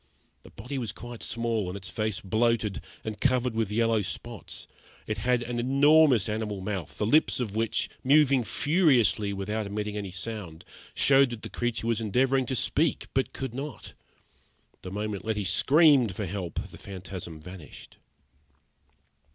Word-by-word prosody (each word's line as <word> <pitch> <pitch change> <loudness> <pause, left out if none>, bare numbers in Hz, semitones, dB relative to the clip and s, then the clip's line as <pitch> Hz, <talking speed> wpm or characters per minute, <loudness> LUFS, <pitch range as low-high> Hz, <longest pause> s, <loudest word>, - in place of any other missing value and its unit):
The - - -15
body 125 +6 -6
was 115 -5 -3
quite 120 +4 -9
small, 115 -4 -1
and 90 +2 -4
its 95 -1 -7
face 110 -6 -2
bloated, 110 0 0 0.2
and 110 -1 -6
covered 125 -2 +2
with 110 -2 -1
yellow 115 0 +2
spots. 95 - -6 0.4
It 110 -1 -3
had 120 +2 +1
an 120 0 -3
enormous 140 -1 +5
animal 105 -2 -3
mouth, 95 -5 -5
the 105 - 0
lips 150 +7 +3
of 110 -5 -3
which, 115 0 0 0.2
moving 140 -2 +4
furiously 130 - +2
without 100 +2 -3
emitting 105 +1 -3
any 100 -2 -4
sound, 95 -4 -6 0.3
showed 135 -1 +5
that 120 -3 -7
the - - -5
creature 120 -1 -2
was 115 -1 0
endeavouring 130 +4 +1
to 130 - -1
speak 150 +5 0
but 135 - 0
could 130 -3 -5
not. 135 0 -7 0.9
The 95 - -7
moment 105 +1 -4
Letty 110 -2 -1
screamed 140 - +4
for 105 - -3
help 90 -2 -4
the - - -12
phantasm 90 -4 -8
vanished. 90 -1 -12
110 Hz, 155 wpm, -27 LUFS, 100-125 Hz, 0.9 s, enormous